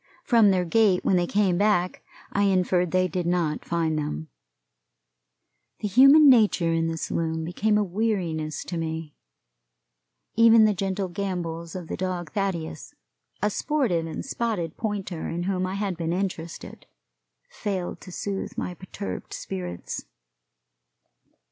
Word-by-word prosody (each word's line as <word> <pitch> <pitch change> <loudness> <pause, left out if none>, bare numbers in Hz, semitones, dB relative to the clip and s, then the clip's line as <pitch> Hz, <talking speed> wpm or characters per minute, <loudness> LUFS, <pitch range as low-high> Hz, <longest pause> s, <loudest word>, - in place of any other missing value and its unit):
From 230 -5 +5
their 185 -2 +2
gait 195 0 +3
when 190 - +3
they 175 -1 +2
came 190 -3 +2
back 200 -4 +1 0.3
I 200 0 +2
inferred 180 -2 +2
they 185 +1 +2
did 180 -2 -2
not 170 -4 0
find 160 -2 0
them. 80 - -4 1.5
The 210 - 0
human 275 +8 +7
nature 210 -9 +5
in 165 0 +1
the 165 0 -3
saloon 160 0 -2
became 210 +5 +1
a 210 - +2
weariness 175 -6 -2
to 175 - -5
me. 160 -2 -4 1.2
Even 230 -1 +7
the 215 - +3
gentle 195 0 -2
gambols 175 -2 -4
of 180 -3 -6
the - - -3
dog 180 -4 -3
Thaddeus, 190 - -3 0.5
a 210 - +2
sportive 220 - 0
and 160 - -5
spotted 215 - -2
pointer 200 -6 -3
in 170 +1 -3
whom 185 0 -1
I 190 - -4
had 195 -3 -2
been 165 0 -1
interested, 180 -3 -5 0.6
failed 190 -4 -4
to 185 - -10
soothe 195 +2 -4
my 180 - -3
perturbed 125 - -7
spirits. 90 -2 -5
180 Hz, 140 wpm, -25 LUFS, 165-205 Hz, 1.5 s, human